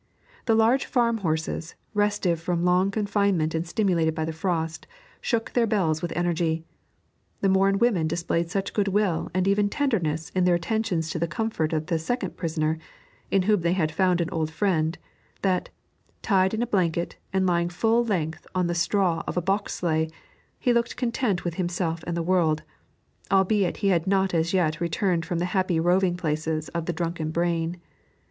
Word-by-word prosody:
The 225 - +4
large 230 +5 +3
farm 235 -3 +2
horses, 160 -1 -2 0.2
restive 205 -5 +1
from 175 0 -1
long 180 +2 +3
confinement 200 -6 +1
and 165 +1 -2
stimulated 170 -5 +1
by 160 - -1
the 160 - -3
frost, 165 -1 -2 0.3
shook 230 -2 -1
their 235 -2 +3
bells 170 -8 +1
with 175 - -3
energy. 165 -2 0 0.8
The 195 - +3
Morin 195 +1 +3
women 195 -8 +2
displayed 170 +1 -1
such 195 +2 -2
goodwill 200 -4 +1
and 185 0 +2
even 205 +1 +3
tenderness 175 - -1
in 185 - +1
their 180 -1 +4
attentions 175 -3 -1
to 165 - -3
the 170 - 0
comfort 165 -2 -1
of 155 -1 -1
the 165 0 0
second 245 +11 -2
prisoner, 160 -2 -1 0.5
in 195 -1 +2
whom 210 -1 +3
they 170 +1 +2
had 160 -4 0
found 180 +2 +2
an 165 - -2
old 160 -1 -1
friend, 160 -2 0 0.5
that, 185 -2 +1 0.5
tied 190 -1 +3
in 225 - 0
a - - +1
blanket 175 -6 0
and 190 -1 +1
lying 170 -1 +2
full 225 +6 +2
length 165 -8 -2
on 180 -1 +2
the 175 - 0
straw 175 -1 +1
of - - -3
a - - +5
box 195 +3 0
sleigh, 160 -2 0 0.5
he 245 - +2
looked 235 0 0
content 235 -6 0
with 175 - -1
himself 175 -2 -2
and 170 -1 -2
the 170 - -1
world, 165 -3 +2 0.7
albeit 195 -1 +2
he - - +5
had 175 -1 +1
not 190 -1 +2
as 165 0 +1
yet 165 -5 +1
returned 170 0 0
from 175 -1 -1
the 175 - 0
happy 185 -4 +1
roving 175 +1 +2
places 155 -2 -2
of 170 -1 -4
the - - +1
drunken 165 -1 -2
brain. 170 +1 -1
175 Hz, 180 wpm, -25 LUFS, 165-200 Hz, 0.8 s, a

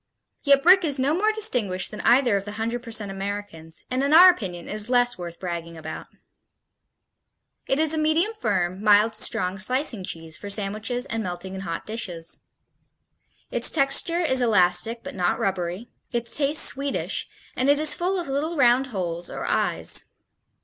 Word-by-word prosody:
Yet 280 -1 +3
Brick 370 +2 +6
is 290 -4 +1
no 270 +3 +1
more 420 +6 +1
distinguished 240 - 0
than 210 - -7
either 240 -2 +3
of 195 - -1
the 205 - -7
hundred 230 +3 -3
percent 220 -4 -4
Americans, 195 -5 -7
and 255 +1 0
in 280 +2 +1
our 365 +3 +9
opinion 180 - -7
is 210 +2 -2
less 245 -1 +2
worth 170 -1 -9
bragging 170 -2 -6
about. 160 0 -8 1.6
It 270 - +1
is 315 0 +2
a 315 - -1
medium 320 +8 +1
firm, 185 - -2
mild 210 +1 +4
to 215 - -5
strong 185 +2 0
slicing 250 -2 0
cheese 165 -3 -6
for 205 - -8
sandwiches 215 +5 -1
and 225 -1 -3
melting 185 -1 -6
in 190 - -6
hot 165 -4 -5
dishes. 180 -7 -4 1.1
Its - - +3
texture 320 +4 +2
is 260 -6 +2
elastic 210 0 +2
but - - -8
not 180 -2 0
rubbery, 185 +3 -3 0.2
its 235 -1 -1
taste 295 +2 +3
sweetish, 275 0 -2 0.3
and 260 +2 0
it 285 0 +4
is 305 -1 +4
full 370 +2 -1
of 345 - -5
little 300 +5 -2
round 255 0 +3
holes 175 -7 -4
or - - -6
eyes. - - +2
225 Hz, 170 wpm, -24 LUFS, 185-280 Hz, 1.6 s, our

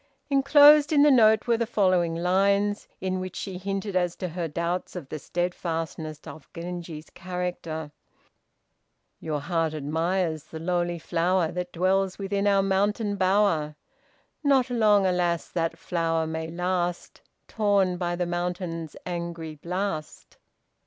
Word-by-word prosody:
" - - -46
Enclosed 290 +2 +7
in 290 -2 +5
the 295 - +6
note 220 -4 +5
were 235 -1 +2
the 230 0 -1
following 185 -6 +2
lines, 200 +4 +1
in 185 0 -1
which 185 0 -6
she 190 -2 -5
hinted 195 +1 -3
as 175 -1 +1
to 185 - -4
her 170 0 -3
doubts 170 +5 -3
of 160 -7 -7
the 155 - -5
steadfastness 165 -2 -3
of 155 - -11
Genji's 170 -2 -7
character: 175 -4 -5 1.3
"Your 155 -2 -3
heart 165 0 -1
admires 160 +2 -1
the 160 - -9
lowly 175 +1 -1
flower 170 +1 0
That 180 0 -4
dwells 190 +2 +1
within 200 0 -1
our 200 -1 +4
mountain 205 +2 +1
bower. 185 -6 +2 0.7
Not 265 -3 +3
long, 210 -4 +4
alas! 175 -2 0
that 165 -1 -2
flower 165 -1 -1
may 160 0 -4
last 175 +1 -2 0.3
Torn 200 -4 +1
by 175 -1 -1
the 175 0 -1
mountain's 175 -2 -3
angry 170 -2 -5
blast." 170 0 -5
180 Hz, 140 wpm, -26 LUFS, 165-195 Hz, 1.3 s, Enclosed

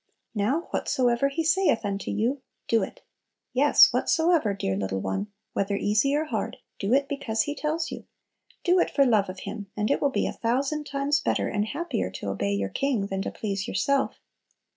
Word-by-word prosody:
Now 230 +9 +1
"whatsoever 250 -1 +1
He 315 +4 -2
saith 335 - +2
unto 200 0 -3
you, 240 +6 0 0.3
do 225 -1 +3
it!" 190 - -6 0.5
Yes, 285 +3 +6
"whatsoever," 325 - +2
dear 95 - -1
little 95 0 -2
one, 95 - -2 0.3
whether 200 +1 0
easy 210 +8 +2
or 305 +2 +1
hard, 305 - -3 0.2
do 200 +2 -1
it 280 0 +2
because 275 -6 -1
He 290 - -3
tells 310 +3 -2
you; - - -7 0.6
do 360 0 +4
it - - +2
for 275 - +3
love 215 -6 +3
of 185 0 -7
Him, 205 -3 -6
and 210 0 +1
it - - +1
will 285 - +3
be 270 - 0
a - - -2
thousand 270 +6 -1
times 280 +1 +1
better - - 0
and 210 -1 0
happier 290 - -2
to 100 - -5
obey 100 +1 -1
your 100 -1 -1
King 260 - 0
than 195 -1 -3
to - - -2
please 200 -2 -3
yourself. 280 -1 +1
235 Hz, 190 wpm, -26 LUFS, 200-285 Hz, 0.6 s, Yes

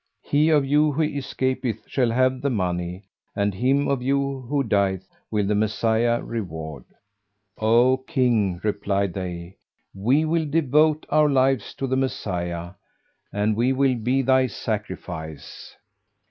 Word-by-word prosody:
[FN#407] - - -23
He 150 +2 +4
of 150 -3 +4
you 150 +2 +3
who 155 - 0
escapeth 130 -5 -2
shall 125 -3 0
have 130 +2 +1
the 140 - 0
money, 90 -4 -2 0.3
and 100 0 0
him 135 +7 +1
of 135 -2 0
you 140 +1 0
who 145 -1 +1
dieth 95 -4 0 0.2
will 105 -2 0
the 105 - +1
Messiah 110 +2 +1
reward." 80 - -6 0.7
"O 120 +4 +4
King," 115 - +1
replied 100 -2 -1
they, 90 -1 -6 0.4
"we 125 +11 +2
will 160 0 0
devote 155 +1 +2
our 150 0 +4
lives 135 -4 +1
to 135 - -3
the 130 0 0
Messiah, 85 -9 -3 0.6
and 105 +1 0
we 120 +4 +2
will 135 0 +2
be 125 +3 0
thy 130 0 +3
sacrifice." 95 - -6
120 Hz, 140 wpm, -23 LUFS, 100-135 Hz, 0.7 s, He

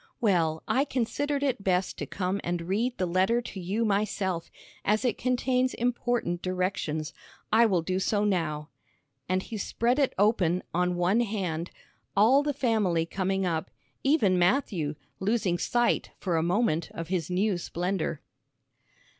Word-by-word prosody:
"Well, 170 -9 +1
I 265 - +3
considered 285 +2 -1
it 260 -8 0
best 185 -1 +1
to - - -4
come 190 +1 -2
and 175 -1 -2
read 220 +8 -1
the 185 - 0
letter 185 +7 +2
to 235 -5 -7
you 200 +6 -1
myself, 195 -4 -1 0.3
as 215 +5 +1
it 240 - +2
contains 255 +1 +1
important 240 -7 -1
directions. 180 -4 -2 0.4
I 230 +1 +6
will 180 -6 +1
do 185 +2 -1
so 205 +2 +1
now," 155 -6 -1 0.6
and 185 0 +1
he 225 - -6
spread 240 +5 0
it 275 - +2
open 185 -4 +2
on 180 +1 +1
one 180 +5 +2
hand, 185 -7 -2 0.5
all 240 +8 +6
the 290 0 0
family 215 - +1
coming 190 +2 -1
up, 165 -3 -1 0.3
even 220 - +3
Matthew, 175 - +1 0.2
losing 190 -3 +1
sight 240 +5 +1
for 180 -3 -1
a 160 - +2
moment 170 -2 +1
of 165 0 -5
his 180 -3 -1
new 185 +1 +1
splendor. 175 -2 -2
190 Hz, 150 wpm, -28 LUFS, 175-235 Hz, 0.6 s, I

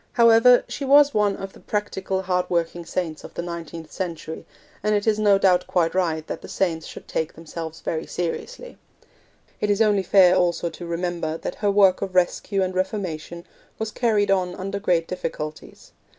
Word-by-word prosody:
However, 235 +1 +6
she - - -5
was 285 +1 +6
one 205 -2 +2
of 195 0 -7
the - - -15
practical, 190 -2 -3
hardworking 175 -2 -1
saints 165 -3 -3
of - - -11
the 170 - -3
nineteenth 170 -1 -7
century, 165 -3 -5 0.3
and 210 0 +1
it 205 - 0
is 215 -1 +2
no 205 -2 +5
doubt 180 -2 +3
quite 175 -3 +1
right 165 -4 0
that - - -6
the - - -10
saints 165 -4 -1
should - - -10
take 160 0 -2
themselves 160 0 -8
very 160 0 -3
seriously. - - -5 0.8
It 210 - -1
is 205 0 +2
only 210 -3 +3
fair 185 -1 +5
also 175 -2 +1
to 175 - -9
remember 170 -2 -2
that - - -5
her 205 - +2
work 195 -2 +4
of 190 -2 -4
rescue 190 +2 +1
and 185 0 -2
reformation 180 -3 -3 0.3
was 220 0 -3
carried 215 -5 +1
on 180 -2 +1
under 195 +2 -4
great 175 -5 +1
difficulties. 155 -4 -6
185 Hz, 180 wpm, -23 LUFS, 170-205 Hz, 0.8 s, However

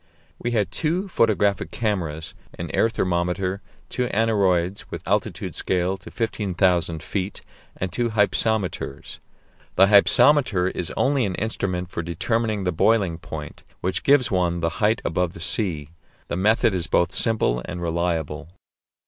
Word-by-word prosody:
We 120 - -2
had 105 -7 0
two 170 - -1
photographic 105 - +1
cameras, 85 -9 -3 0.2
an 85 -2 -5
air 115 - +2
thermometer, 90 0 -1 0.3
two 125 -1 -2
aneroids 100 -4 +1
with - - -8
altitude - - -1
scale 90 +1 0
to 95 - -12
15,000 90 -7 0
feet, 95 0 -4 0.4
and 95 -1 -3
two 120 -1 0
hypsometers. 105 -6 -1 0.6
The 95 - +7
hypsometer 105 0 +5
is 85 - -3
only 135 -1 +2
an 95 - -3
instrument 90 -4 -3
for - - -3
determining 105 +5 -1
the 90 - 0
boiling 90 -1 +2
point, - - -8 0.2
which 95 +1 -1
gives 140 -3 +3
one 90 -2 +1
the 85 - +1
height 110 +2 +2
above 85 +1 0
the - - -11
sea. 80 -5 -1 0.4
The - - -2
method 105 +3 +3
is 90 -2 0
both 85 - +2
simple 105 - +2
and 90 -1 -6
reliable. 80 -2 -2
95 Hz, 140 wpm, -23 LUFS, 85-110 Hz, 0.6 s, The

